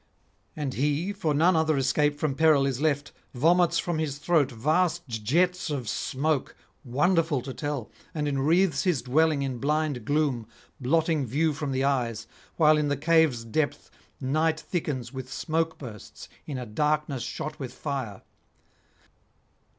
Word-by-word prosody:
And 145 -4 -3
he, 150 +8 0
for 190 -6 -1
none 170 +5 +4
other 160 -2 +2
escape 145 +2 +1
from 150 -2 0
peril 150 -1 +4
is 135 -1 -2
left, 145 -2 0 0.2
vomits 170 +6 +3
from 170 -3 -1
his 145 -3 -2
throat 155 -2 +2
vast 160 +7 +1
jets 155 - 0
of 135 -6 -3
smoke, 140 +5 -1 0.3
wonderful 150 +3 +2
to 130 0 -6
tell, 145 -7 -4 0.2
and 150 -2 -2
enwreathes 150 +3 +2
his 170 -10 0
dwelling 150 +2 +2
in 130 -3 -3
blind 150 -3 0
gloom, 140 -4 0 0.3
blotting 155 +1 +1
view 150 +6 +1
from 145 -1 -3
the 130 0 0
eyes, 120 -5 0 0.3
while 155 -1 +5
in 150 - +1
the 145 -1 0
cave's 155 -6 +3
depth 145 +6 -2 0.3
night 155 +4 +1
thickens 150 -7 -3
with 130 0 -7
smoke 160 +1 -1
bursts 110 -7 -10 0.2
in 145 -4 -4
a 125 - -5
darkness 150 +3 0
shot 150 +5 -5
with 130 -3 -5
fire. 130 -8 -5
145 Hz, 150 wpm, -27 LUFS, 130-160 Hz, 0.3 s, while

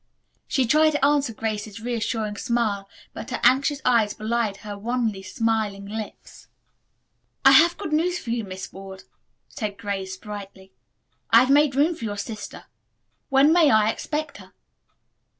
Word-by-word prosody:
She 265 -3 +1
tried 310 +6 +4
to 290 -2 +2
answer 285 -3 +2
Grace's 215 -1 -4
reassuring 225 -2 -3
smile, 210 -5 -1 0.2
but - - -8
her - - -3
anxious 275 +4 +3
eyes 230 -4 +3
belied 220 -2 -1
her 205 -1 -5
wanly 225 -1 -2
smiling 210 0 -2
lips. 215 +1 -8 1.0
"I 270 - +9
have 330 +6 +6
good 315 - -5
news 350 +3 +1
for 235 - -6
you, 235 -1 -1
Miss 190 -1 -8
Ward," 190 0 -10 0.4
said 210 -4 -5
Grace 195 -2 -4
brightly. 195 -2 -10 0.6
"I 230 - +7
have 255 +2 +2
made 290 -1 +4
room 300 +5 +3
for 235 - -7
your 205 -1 -4
sister. 210 0 -7 0.7
When 275 +3 +5
may 335 -4 +5
I 215 -2 +4
expect 300 +3 -4
her?" - - -15
225 Hz, 150 wpm, -24 LUFS, 205-275 Hz, 1.0 s, I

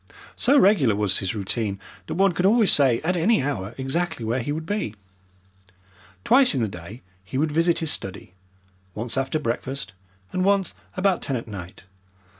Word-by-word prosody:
So 280 +3 +4
regular 175 - +4
was 105 -2 +1
his 95 +2 -3
routine 100 0 -2 0.3
that - - -4
one 195 +1 +3
could 180 +2 +1
always 220 -1 +4
say 130 -5 +4
at 175 +4 0
any 180 - +2
hour 115 -6 -3
exactly 135 0 -2
where 115 +4 0
he 140 +4 -3
would 160 +2 -4
be. 205 - -3 1.3
Twice 255 - +5
in 130 - 0
the - - 0
day 95 +5 -10 0.2
he 95 +7 -6
would 150 +2 +1
visit 165 +2 +2
his 150 - +3
study, 95 -1 -4 0.6
once 115 +2 -1
after 135 +3 -1
breakfast, 130 -3 -4 0.4
and 185 - -1
once 195 -1 +2 0.2
about 185 -1 +1
ten 135 - -2
at 115 - -5
night. 95 -5 -9
135 Hz, 175 wpm, -24 LUFS, 110-180 Hz, 1.3 s, Twice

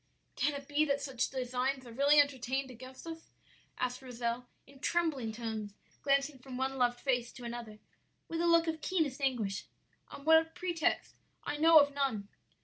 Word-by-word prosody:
"'Can 295 - +1
it 280 0 -7
be 295 +1 +2
that 280 -1 +1
such 270 -3 -1
designs 255 +1 -1
are 235 - -10
really 285 +5 +5
entertained 265 -1 +1
against 255 +3 -11
us?' 325 0 -8 0.5
asked 250 0 -2
Rozel, 245 -1 -3 0.2
in 275 0 -17
trembling 295 -8 0
tones, 220 -2 -5 0.3
glancing 275 0 +1
from 255 0 -8
one 265 +1 -1
loved 245 -1 +2
face 245 -3 0
to 250 - -11
another 235 -2 -6 0.5
with 330 0 -2
a 345 - +2
look 335 0 +5
of 320 -1 -2
keenest 310 -7 0
anguish. 235 -8 0 0.4
'On 280 - -11
what 320 0 +5
pretext? 345 -3 -1 0.3
I 295 - -3
know 325 +1 +7
of 285 -1 +6
none.' 265 -8 -1
270 Hz, 170 wpm, -33 LUFS, 245-295 Hz, 0.5 s, know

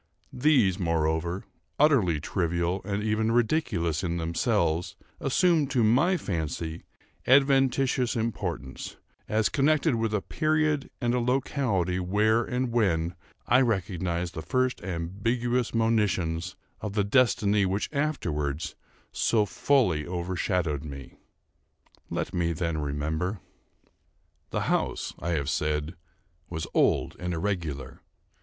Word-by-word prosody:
These, 125 - +3
moreover, 85 +1 0 0.3
utterly 120 - +4
trivial, 85 +3 -1
and 105 0 -2
even 110 +1 +1
ridiculous 110 - +1
in 85 -1 -1
themselves, 85 +2 0 0.2
assume, 160 +1 +3
to 130 -4 +1
my 135 +12 +4
fancy, 80 - -4 0.4
adventitious 135 -2 +3
importance, 90 - -4 0.3
as 110 -1 +2
connected 150 - +2
with 115 -1 0
a 105 - 0
period 155 -2 0
and 120 -2 0
a 125 - +2
locality 120 - 0
when 105 +5 +2
and 125 0 0
where 90 -7 +1 0.3
I 125 +2 +5
recognise 90 -6 -1
the 80 - -6
first 130 +9 0
ambiguous 110 +8 -1
monitions 95 -7 0 0.2
of 105 -2 -5
the 105 -1 +2
destiny 105 -3 +3
which 95 +3 -1
afterwards 80 - -2 0.4
so 110 -3 +2
fully 120 - +1
overshadowed 90 -3 -1
me. 70 -4 -8 1.0
Let - - -3
me 85 -1 0
then 85 -1 -2
remember. 80 +7 -2 1.1
The - - -2
house, - - -1
I 85 +2 -2
have 70 -4 -1
said, 75 +1 -1 0.6
was 80 -2 -4
old - - +2
and 90 -1 -2
irregular. 80 -8 -3
95 Hz, 115 wpm, -27 LUFS, 85-120 Hz, 1.1 s, I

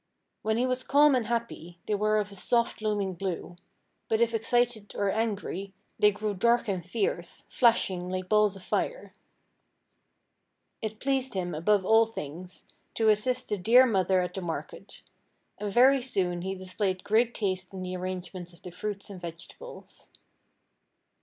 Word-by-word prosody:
When 220 +1 0
he 245 - +2
was 255 0 0
calm 285 +2 +5
and 245 -4 +1
happy 230 -7 -4
they 215 - -1
were 215 +1 +2
of 205 -1 -1
a - - -10
soft 235 +4 0
looming 205 -3 -1
blue, 180 -1 -4 0.5
but 220 - +2
if 235 0 +2
excited 230 -1 0
or 200 -1 +1
angry, 200 -3 -3 0.3
they 210 -1 +6
grew 210 0 -3
dark 235 +5 +2
and 185 -4 -2
fierce, 180 -2 -3
flashing 190 -7 +2
like 185 0 -3
balls 210 -1 +3
of 195 - -11
fire. - - -2 1.7
It 220 0 -5
pleased 265 -3 0
him 180 -2 -2
above 190 +5 +2
all 225 +2 +5
things, 180 -2 -8 0.3
to 225 -1 +3
assist 250 +4 +1
the 210 - -1
dear 240 +7 +6
mother 190 -5 +2
at 180 0 -3
the 190 - -4
market, 170 -2 -7 0.6
and 210 -1 -3
very 260 +5 +5
soon 185 -9 -1
he 190 +2 -3
displayed 185 0 -2
great 230 +3 +2
taste 185 -3 -2
in 190 -1 -6
the 185 0 -4
arrangements 185 -1 -6
of 170 - -20
the 180 - -8
fruits 200 +3 -5
and 185 -3 -9
vegetables. 170 - -10
205 Hz, 160 wpm, -28 LUFS, 185-230 Hz, 1.7 s, they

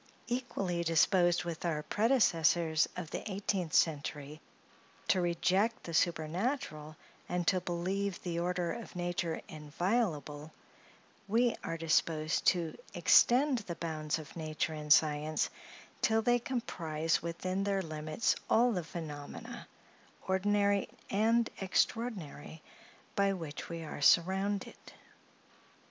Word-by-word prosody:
Equally 200 -8 -2
disposed 175 +2 +3
with 170 -2 -5
our 155 -3 -1
predecessors 170 - +2
of 170 -3 -6
the - - -3
eighteenth 190 -4 -2
century 150 -1 0 0.7
to 185 - +4
reject 185 +6 +1
the 170 - -7
supernatural, 165 - -1 0.3
and 175 -1 -1
to 185 +1 +2
believe 185 +3 -2
the 170 -2 -2
order 175 0 -1
of 230 - -9
nature 175 -2 -2
inviolable, 155 - -2 0.8
we 235 +3 +2
are 165 - -3
disposed 160 -1 +1
to 170 -3 +2 0.2
extend 250 - +5
the 185 -6 -6
bounds 155 -2 -2
of 155 -2 -10
nature 155 -1 -2
and 150 -1 -5
science, 155 0 +3 0.5
till 225 0 +3
they 245 +1 +3
comprise 165 -11 -2
within 185 +4 -2
their 195 -1 0
limits 155 +4 -1
all 240 +2 +4
the 180 -6 -2
phenomena, 155 -3 -8 0.6
ordinary 200 +1 +2 0.2
and 225 +3 +2
extraordinary, 185 -6 -2 0.5
by 200 0 +2
which 160 -5 -6
we 165 -1 -5
are 150 - -7
surrounded. 190 +6 +2
175 Hz, 115 wpm, -32 LUFS, 155-200 Hz, 0.8 s, extend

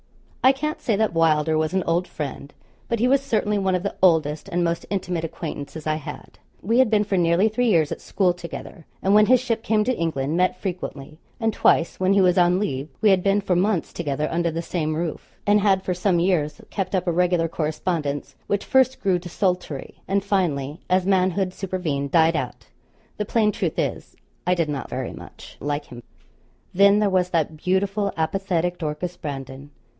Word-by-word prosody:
I 260 - +8
can't 305 +3 -3
say 225 - +1
that 215 -2 +1
Wylder 160 -1 +2
was 155 +3 -1
an 190 - +1
old 170 +2 +1
friend. 140 -1 -6 0.4
But 235 - +1
he 240 - +3
was 275 +1 +4
certainly 210 -5 0
one 190 -1 +1
of 180 - -2
the 200 - -2
oldest 160 -1 +2
and 175 -2 0
most 170 0 -1
intimate 180 -4 -2
acquaintances 155 -1 -6
I 155 0 +1
had. 155 - -9 0.2
We 230 +6 +2
had 260 -3 +5
been 210 -1 +3
for 200 -2 -1
nearly 175 +4 +3
three 245 +3 0
years 165 -8 +3
at - - -5
school 185 -3 +1
together; 170 -1 -9 0.2
and 195 - +3
when 210 0 +6
his 255 0 +6
ship 235 -2 -2
came 215 -1 +2
to 255 +3 0
England, 155 -4 -1
met 180 +1 +1
frequently; 155 -5 -6 0.2
and 225 -2 0
twice, 165 - +2
when 185 +1 +3
he 200 - +4
was 180 -1 +4
on 175 +1 +4
leave, 145 -8 -3
we 215 - +4
had 190 -1 +3
been 195 +2 +2
for 190 -2 0
months 185 0 0
together 150 -2 -2
under 170 0 +1
the 165 +1 -3
same 155 -3 -2
roof; 165 0 -5
and 205 0 +4
had 195 -2 +3
for 185 - -1
some 180 0 +1
years 160 -5 0
kept 195 -1 -2
up 185 -1 0
a 175 - +1
regular 175 -1 +2
correspondence, 155 -2 -3
which 200 0 -1
first 265 0 +3
grew 190 -3 +2
desultory, 180 -4 -3
and 195 0 +1
finally, 160 -7 -1
as 185 0 +2
manhood 185 -1 +1
supervened, 175 -8 -3
died 165 +2 +4
out. - - -4 0.5
The 210 - -2
plain 215 0 +2
truth - - -3
is, - - -3 0.3
I 180 - +4
did 165 -3 0
not 145 -2 -4
very - - -4
much - - -12
like 145 +1 -3
him. 120 -1 -11 0.7
Then 200 +2 +6
there 210 -2 +2
was 180 -1 +2
that 160 -3 0
beautiful 195 +4 0
apathetic 175 +1 -1
Dorcas 165 +3 -3
Brandon. 135 -1 -7
180 Hz, 200 wpm, -23 LUFS, 160-200 Hz, 0.7 s, I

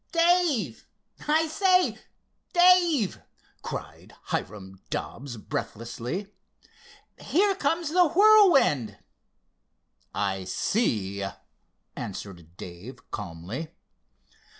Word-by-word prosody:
"Dave! 335 - +2 0.4
I 315 +2 +3
say, 370 +2 +2 0.5
Dave!" 350 - +4 0.4
cried - - -8
Hiram 95 -2 -5
Dobbs 125 -2 -5
breathlessly. 120 - -5 0.9
"Here 395 +5 +2
comes 330 -1 -1
the 355 +2 +4
Whirlwind!" 340 - +5 1.1
"I 95 -2 -2
see," 100 - -1 0.7
answered 90 -4 -8
Dave 100 +9 -11
calmly. 100 - -6
180 Hz, 70 wpm, -26 LUFS, -, 1.1 s, Whirlwind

